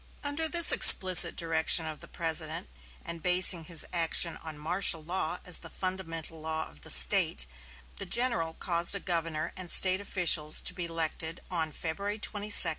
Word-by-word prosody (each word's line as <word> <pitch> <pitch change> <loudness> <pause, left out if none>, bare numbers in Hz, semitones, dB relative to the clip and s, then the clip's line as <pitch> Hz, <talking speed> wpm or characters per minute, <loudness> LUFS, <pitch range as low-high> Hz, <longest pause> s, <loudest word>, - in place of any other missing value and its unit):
Under 290 +3 -4
this 340 0 +3
explicit 185 -2 +7
direction 165 0 -1
of 155 -1 -9
the - - -13
President, 165 - -3 0.4
and 170 -1 -8
basing 180 -1 +3
his 165 -1 -4
action 170 0 0
on 160 -2 -12
martial 165 +1 0
law 175 0 -4
as 180 - +1
the 165 - -11
fundamental 165 -3 -8
law 160 0 -6
of 75 0 -20
the - - -10
State, - - +5 0.5
the - - -7
general 175 -10 -3
caused 170 +1 -2
a - - -6
governor 165 -4 -6
and 185 -2 -9
State 185 +2 +3
officials 170 -6 0
to - - -5
be 180 -1 -5
elected 165 0 -6
on 160 -3 -5
February 200 +8 -7
22, 215 - -6 0.2
1864. 185 -4 +6
170 Hz, 170 wpm, -26 LUFS, 160-185 Hz, 0.5 s, explicit